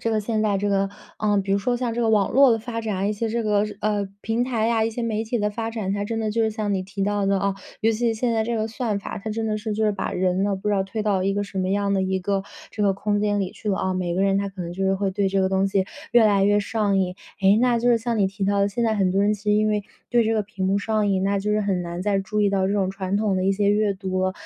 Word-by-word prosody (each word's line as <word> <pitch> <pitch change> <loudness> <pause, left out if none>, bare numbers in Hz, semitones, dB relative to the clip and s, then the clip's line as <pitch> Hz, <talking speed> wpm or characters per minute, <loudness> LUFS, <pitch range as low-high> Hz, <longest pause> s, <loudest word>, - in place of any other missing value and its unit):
这 230 - -1
个 220 -1 +1
现 215 +1 -1
在 205 -2 +1
这 205 +1 -1
个， 195 0 +1 0.3
啊， 210 -1 +1
比 195 0 0
如 200 - +3
说 245 +5 0
像 240 -1 -2
这 240 - -1
个 230 - +2
网 210 -3 +3
络 270 +1 +6
的 225 - +3
发 230 0 -5
展， 200 -3 -1
一 - - 0
些 225 +2 -2
这 230 +1 -1
个 210 -1 +2 0.2
呃， 205 -2 0
平 225 +2 0
台 235 -3 0
呀， 225 -1 +2
一 225 - 0
些 235 +2 -4
媒 220 -1 -1
体 235 +2 -2
的 210 0 0
发 225 +2 -4
展， 215 -4 -3
它 205 0 -2
真 225 +2 -3
的 220 -1 -1
就 230 +1 +1
是 220 - +1
像 215 -2 -2
你 190 - -1
提 195 +1 -5
到 205 0 0
的 195 0 +2
啊， 200 0 0 0.3
尤 225 +1 +3
其 230 +1 0
现 235 +2 -1
在 225 -1 +1
这 230 +1 -2
个 220 0 0
算 220 -2 -2
法， 200 - -6
它 220 +2 -5
真 220 +1 -2
的 215 -1 0
是 215 +1 -4
就 220 +1 0
是 210 - +2
把 200 - -3
人 185 +1 0
呢， 200 -1 0
不 190 +2 -4
知 205 - +2
道 195 - +2
推 215 +3 -4
到 200 -3 +1
一 195 +1 +1
个 205 +1 -1
什 200 -1 -6
么 185 0 0
样 200 +1 0
的 190 - +1
一 190 0 0
个 195 +1 -1 0.3
这 210 - -3
个 200 -1 +3
空 205 +1 -1
间 205 0 +1
里 190 -1 -3
去 215 - -7
了 195 - +1
啊。 185 0 -1
每 180 -2 -1
个 190 - +2
人 195 0 +2
他 200 0 -1
可 190 -1 -7
能 170 0 -5
就 195 +2 -2
是 190 0 +2
会 195 0 -1
对 195 0 +1
这 195 0 +1
个 190 - +2
东 190 +1 +1
西 195 -1 +1 0.3
越 240 -1 +6
来 200 -2 +4
越 205 +1 +4
上 205 -1 0
瘾。 180 -1 0 0.3
诶， 195 +1 +5
那 245 -1 +3
就 240 +1 +1
是 240 - +5
像 230 0 -2
你 200 - +3
提 195 +1 -4
到 200 0 +2
的， 200 - +3
现 205 +4 -2
在 225 -1 +2
很 190 -2 +2
多 195 +1 +2
人 205 +1 +3
其 205 -1 -6
实 210 - +2
因 215 +1 +3
为 210 -1 0 0.3
对 240 -1 +3
这 225 +1 +1
个 215 - +1
屏 195 -2 -4
幕 195 +1 +2
上 215 0 0
瘾， 190 -1 +1
那 200 +1 +1
就 210 +2 -1
是 210 - +2
很 195 -3 0
难 175 +1 -5
再 200 0 +1
注 205 +2 -2
意 205 -1 +3
到 190 -1 +1
这 195 - 0
种 195 -2 +1
传 190 0 -2
统 205 -2 +1
的 185 - 0
一 195 - +3
些 200 +1 +2
阅 210 0 +2
读 190 -1 -3
了。 185 - 0
205 Hz, 355 characters per minute, -23 LUFS, 195-220 Hz, 0.3 s, 络